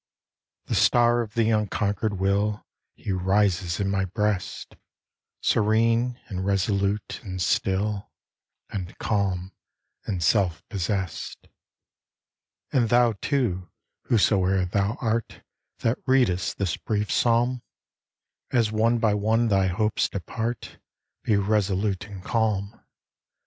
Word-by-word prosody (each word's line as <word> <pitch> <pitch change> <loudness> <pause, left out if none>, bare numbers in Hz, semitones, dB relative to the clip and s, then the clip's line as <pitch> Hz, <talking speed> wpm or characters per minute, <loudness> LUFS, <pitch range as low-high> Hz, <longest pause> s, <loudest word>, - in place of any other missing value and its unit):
The - - -3
star 120 0 +4
of 110 0 -7
the 115 -1 +2
unconquered 105 -1 0
will, 100 +2 0 0.3
He 100 - -5
rises 95 -1 +1
in 100 - 0
my 95 -1 +1
breast, 105 0 -2 0.7
Serene, 115 +3 +2
and 95 -3 -4
resolute, 100 +1 0
and 95 -4 -6
still, 100 +3 0 0.6
And 95 -2 -5
calm, 95 -3 -1 0.6
and 90 -4 -2
self 85 -2 +1
possessed. 95 -4 -3 1.3
And 120 -4 +3
thou, 120 0 +4
too, 110 -11 -1 0.4
whosoe'er 95 -4 +3
thou 100 +4 0
art, 115 -1 -2 0.4
That 115 +3 +1
readest 125 -10 +2
this 95 -4 -1
brief 105 -1 -2
psalm, 120 +1 +2 0.9
As 115 -4 +2
one 115 +2 +2
by 110 -2 +2
one 110 +3 +2
thy 95 -2 +3
hopes 105 +4 0
depart, 115 +4 -4 0.4
Be 110 - +1
resolute 100 -1 0
and 100 -3 -9
calm. 110 -2 -1
105 Hz, 110 wpm, -25 LUFS, 95-115 Hz, 1.3 s, star